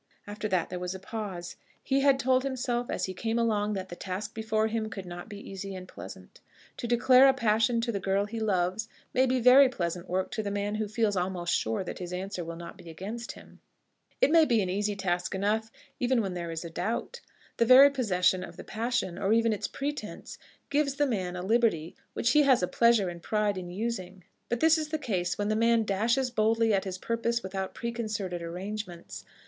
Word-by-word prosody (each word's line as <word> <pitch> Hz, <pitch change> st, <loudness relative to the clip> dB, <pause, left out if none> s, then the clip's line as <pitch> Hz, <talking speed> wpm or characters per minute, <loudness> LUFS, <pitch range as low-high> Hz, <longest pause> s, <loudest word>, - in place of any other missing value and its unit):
After 210 Hz, +1 st, -4 dB
that 185 Hz, -4 st, 0 dB
there 180 Hz, -, -3 dB
was 180 Hz, +1 st, -4 dB
a -, -, -7 dB
pause. 190 Hz, -4 st, -6 dB, 0.3 s
He 270 Hz, 0 st, +1 dB
had 275 Hz, -1 st, +4 dB
told 260 Hz, 0 st, +2 dB
himself 245 Hz, -2 st, -2 dB
as -, -, -1 dB
he 185 Hz, -, -5 dB
came 225 Hz, +5 st, -2 dB
along 215 Hz, -3 st, +1 dB
that 190 Hz, -1 st, -4 dB
the 175 Hz, -, -7 dB
task 190 Hz, +3 st, -5 dB
before 220 Hz, 0 st, 0 dB
him 220 Hz, 0 st, -2 dB
could 195 Hz, -2 st, -7 dB
not 175 Hz, +3 st, -8 dB
be 205 Hz, -, -8 dB
easy 195 Hz, 0 st, -6 dB
and 185 Hz, 0 st, -8 dB
pleasant. -, -, -11 dB, 0.4 s
To 235 Hz, -, -4 dB
declare 250 Hz, +3 st, +6 dB
a 265 Hz, -, +4 dB
passion 230 Hz, -1 st, +2 dB
to 235 Hz, 0 st, -1 dB
the 200 Hz, -, -2 dB
girl 195 Hz, +1 st, +1 dB
he 225 Hz, +2 st, -5 dB
loves 205 Hz, +1 st, 0 dB, 0.2 s
may 260 Hz, +1 st, +3 dB
be 255 Hz, 0 st, +1 dB
very 255 Hz, +3 st, +7 dB
pleasant 175 Hz, -6 st, -4 dB
work 185 Hz, +1 st, -1 dB
to 220 Hz, -, -2 dB
the 205 Hz, -, -3 dB
man 205 Hz, +1 st, -2 dB
who 215 Hz, -, -1 dB
feels 215 Hz, -1 st, 0 dB
almost 180 Hz, -1 st, -1 dB
sure 110 Hz, +9 st, 0 dB
that -, -, -7 dB
his 180 Hz, -1 st, -6 dB
answer 185 Hz, 0 st, -4 dB
will 165 Hz, 0 st, -6 dB
not 170 Hz, +4 st, -9 dB
be 175 Hz, -2 st, -11 dB
against 210 Hz, +8 st, -6 dB
him. -, -, -16 dB, 0.6 s
It -, -, +4 dB
may 330 Hz, 0 st, +7 dB
be 240 Hz, -7 st, +3 dB
an 180 Hz, -, -2 dB
easy 205 Hz, +2 st, -1 dB
task 180 Hz, -1 st, -1 dB
enough 215 Hz, +3 st, 0 dB, 0.3 s
even 250 Hz, 0 st, +2 dB
when 190 Hz, -2 st, -3 dB
there 170 Hz, -1 st, -4 dB
is 165 Hz, +1 st, -5 dB
a 165 Hz, -, -7 dB
doubt. 230 Hz, -, -3 dB, 0.4 s
The 230 Hz, -, +3 dB
very 270 Hz, +3 st, +9 dB
possession 185 Hz, -8 st, +1 dB
of -, -, -10 dB
the -, -, -8 dB
passion, 220 Hz, -5 st, -2 dB
or 200 Hz, +1 st, +2 dB
even 230 Hz, 0 st, +3 dB
its 205 Hz, -, -3 dB
pretence, 290 Hz, +2 st, -5 dB, 0.3 s
gives 285 Hz, -1 st, +1 dB
the 290 Hz, +1 st, +2 dB
man 185 Hz, -9 st, -2 dB
a 180 Hz, -, -4 dB
liberty 210 Hz, -7 st, +1 dB, 0.2 s
which 235 Hz, -, +1 dB
he 300 Hz, -, +6 dB
has 265 Hz, -8 st, +4 dB
a -, -, +2 dB
pleasure 235 Hz, -3 st, +3 dB
and 175 Hz, 0 st, -7 dB
a -, -, -22 dB
pride 210 Hz, +1 st, 0 dB
in 180 Hz, -2 st, -6 dB
using. 190 Hz, -2 st, -4 dB, 0.3 s
But 240 Hz, 0 st, -1 dB
this 320 Hz, 0 st, +5 dB
is 310 Hz, -, -3 dB
the 315 Hz, -, -1 dB
case 185 Hz, -11 st, -2 dB
when 205 Hz, 0 st, -1 dB
the 215 Hz, -, +1 dB
man 230 Hz, 0 st, +3 dB
dashes 230 Hz, +6 st, +1 dB
boldly 225 Hz, 0 st, +2 dB
at 195 Hz, -1 st, +1 dB
his 185 Hz, -1 st, -4 dB
purpose 230 Hz, +3 st, -1 dB
without 190 Hz, 0 st, -4 dB
preconcerted 215 Hz, -6 st, -3 dB
arrangements. 180 Hz, +1 st, -6 dB
210 Hz, 220 wpm, -29 LUFS, 185-235 Hz, 0.6 s, very